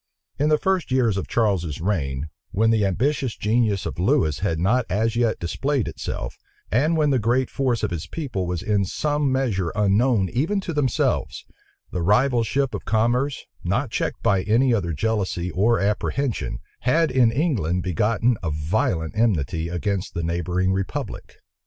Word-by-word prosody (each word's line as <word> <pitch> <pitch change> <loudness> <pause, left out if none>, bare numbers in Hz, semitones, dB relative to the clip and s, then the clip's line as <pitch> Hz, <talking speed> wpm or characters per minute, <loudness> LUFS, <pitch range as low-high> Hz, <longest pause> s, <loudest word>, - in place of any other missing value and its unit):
In 150 +2 +2
the 155 - +4
first 190 -1 0
years 125 -5 +2
of 95 - -3
Charles's 95 -10 0
reign, 80 -7 -1 0.2
when 115 +3 +2
the 105 -3 +3
ambitious 130 +5 -1
genius 105 -2 +1
of - - -5
Lewis 75 -3 +2
had 80 - 0
not 110 +10 +2
as 110 +4 0
yet 115 -2 +1
displayed 135 - -1
itself, - - -5 0.3
and 150 +8 +2
when 150 -2 +3
the 130 - +2
great 120 +3 +1
force 125 -5 0
of 105 - 0
his 85 -3 -4
people 125 - -3
was 90 -1 -3
in 105 -2 +1
some 145 +7 0
measure 110 -10 0
unknown 105 +1 +3
even 160 - 0
to 175 - -4
themselves, 140 -5 0 0.5
the 90 - -2
rival 120 +7 +3
ship 135 +3 0
of - - -4
commerce, 120 +5 0 0.2
not 110 +8 -1
checked - - -2
by 100 -2 +3
any 120 +6 +3
other 95 -7 0
jealousy 95 -1 -1
or 115 +4 +2
apprehension, 105 +5 -1 0.2
had 155 +5 +2
in 125 -3 +4
England 115 - 0
begotten 105 +6 +1
a 85 - -2
violent 80 +2 -1
enmity 85 -7 0
against 95 +2 -2
the 85 - -2
neighboring 90 +3 0
republic. 95 -2 -4
110 Hz, 165 wpm, -23 LUFS, 90-130 Hz, 0.5 s, the